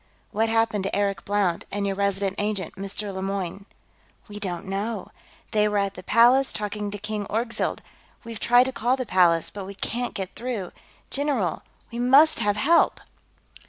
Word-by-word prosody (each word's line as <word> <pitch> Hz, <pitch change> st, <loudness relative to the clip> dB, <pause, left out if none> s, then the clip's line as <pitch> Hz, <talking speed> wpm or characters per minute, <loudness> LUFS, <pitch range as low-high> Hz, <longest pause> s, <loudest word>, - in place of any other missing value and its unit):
"What 225 Hz, +2 st, +1 dB
happened 225 Hz, -3 st, +1 dB
to -, -, -1 dB
Eric 200 Hz, -1 st, -1 dB
Blount 200 Hz, -4 st, 0 dB
and 205 Hz, 0 st, -2 dB
your 195 Hz, -1 st, -1 dB
Resident 200 Hz, -1 st, 0 dB
Agent, 205 Hz, -4 st, -2 dB
Mr. 200 Hz, +1 st, -5 dB
Lemoyne?" 195 Hz, 0 st, -4 dB, 0.6 s
"We 210 Hz, -1 st, -8 dB
don't 185 Hz, -2 st, -4 dB
know. 200 Hz, +2 st, -3 dB, 0.4 s
They 210 Hz, -2 st, +3 dB
were 210 Hz, 0 st, 0 dB
at 200 Hz, -1 st, 0 dB
the -, -, -9 dB
Palace, 245 Hz, +7 st, +4 dB
talking 210 Hz, 0 st, -3 dB
to 205 Hz, -, -5 dB
King 210 Hz, 0 st, -4 dB
Orgzild. 230 Hz, +2 st, -2 dB, 0.4 s
We've 230 Hz, -2 st, -7 dB
tried 245 Hz, +1 st, +5 dB
to 260 Hz, -, -2 dB
call 255 Hz, 0 st, 0 dB
the 255 Hz, -, -3 dB
Palace, 175 Hz, -5 st, +3 dB
but 200 Hz, -2 st, -7 dB
we 200 Hz, +1 st, -8 dB
can't 240 Hz, +5 st, -3 dB
get 190 Hz, -1 st, -4 dB
through, 230 Hz, -6 st, -4 dB, 0.4 s
general, 270 Hz, -, 0 dB, 0.3 s
we 235 Hz, -, -5 dB
must 275 Hz, +6 st, +6 dB
have 205 Hz, -2 st, +1 dB
help...." 330 Hz, +10 st, +3 dB
205 Hz, 170 wpm, -25 LUFS, 195-230 Hz, 0.6 s, must